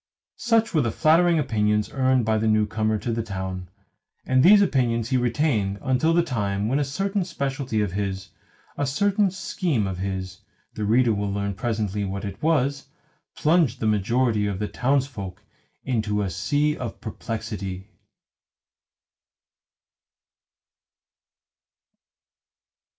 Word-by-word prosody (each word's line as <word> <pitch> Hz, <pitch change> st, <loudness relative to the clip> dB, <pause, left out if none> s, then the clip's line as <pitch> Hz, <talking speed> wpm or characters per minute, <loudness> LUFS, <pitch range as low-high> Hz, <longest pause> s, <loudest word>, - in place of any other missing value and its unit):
Such 230 Hz, -2 st, +2 dB
were 155 Hz, -, +3 dB
the 120 Hz, -, 0 dB
flattering 170 Hz, +5 st, +4 dB
opinions 105 Hz, -6 st, 0 dB
earned 130 Hz, -3 st, +2 dB
by 110 Hz, 0 st, +2 dB
the 110 Hz, -, 0 dB
newcomer 110 Hz, 0 st, +1 dB
to 110 Hz, +3 st, -3 dB
the 115 Hz, -, -1 dB
town; 95 Hz, -4 st, -5 dB, 0.6 s
and 130 Hz, 0 st, +3 dB
these 200 Hz, +8 st, +8 dB
opinions 120 Hz, -, 0 dB
he 130 Hz, -, +1 dB
retained 120 Hz, -6 st, 0 dB
until 130 Hz, +4 st, +1 dB
the 170 Hz, +1 st, +3 dB
time 105 Hz, -8 st, -1 dB
when 135 Hz, +5 st, +1 dB
a -, -, +2 dB
certain 195 Hz, +8 st, -1 dB
speciality 135 Hz, -8 st, -2 dB
of 100 Hz, -3 st, -1 dB
his, 95 Hz, 0 st, -4 dB, 0.5 s
a 145 Hz, -, +1 dB
certain 200 Hz, +8 st, +2 dB
scheme 180 Hz, -, -1 dB
of 95 Hz, -2 st, -4 dB
his 95 Hz, 0 st, -4 dB, 0.3 s
(the 105 Hz, -, -3 dB
reader 115 Hz, +2 st, +3 dB
will 100 Hz, -1 st, -2 dB
learn 100 Hz, 0 st, -2 dB
presently 105 Hz, -1 st, -2 dB
what 100 Hz, +1 st, -4 dB
it 100 Hz, -1 st, -7 dB
was), 140 Hz, -3 st, +1 dB, 0.5 s
plunged 150 Hz, -6 st, +2 dB
the -, -, -2 dB
majority 110 Hz, +1 st, +1 dB
of 100 Hz, -2 st, -2 dB
the 105 Hz, +1 st, -2 dB
townsfolk 125 Hz, -9 st, -2 dB, 0.4 s
into 110 Hz, -5 st, -1 dB
a 95 Hz, -, -2 dB
sea 145 Hz, -, 0 dB
of 120 Hz, -5 st, -6 dB
perplexity. 105 Hz, -4 st, -6 dB
115 Hz, 130 wpm, -24 LUFS, 100-140 Hz, 0.6 s, these